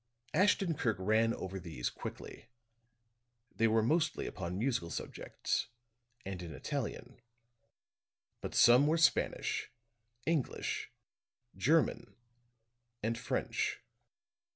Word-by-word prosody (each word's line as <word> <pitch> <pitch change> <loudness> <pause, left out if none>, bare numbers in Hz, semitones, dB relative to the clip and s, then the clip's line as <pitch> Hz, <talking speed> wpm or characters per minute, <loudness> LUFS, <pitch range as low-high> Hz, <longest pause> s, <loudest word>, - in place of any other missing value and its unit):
Ashton 190 0 +3
Kirk 115 - 0
ran 110 +4 +3
over 95 -3 -4
these 80 -9 -4
quickly; - - -8 1.1
they 115 - +3
were 110 0 +3
mostly 155 +6 +1
upon 90 -1 -4
musical 115 -7 0
subjects, - - -3 0.6
and 95 -2 -5
in 85 -3 -7
Italian. 125 -3 -4 1.2
But - - -5
some 125 +5 +7
were 160 +2 +3
Spanish, 165 - +2 0.6
English, 160 -6 -1 0.7
German 160 +3 +2 0.9
and 115 +2 +1
French. 120 - -1
115 Hz, 95 wpm, -34 LUFS, 95-150 Hz, 1.2 s, some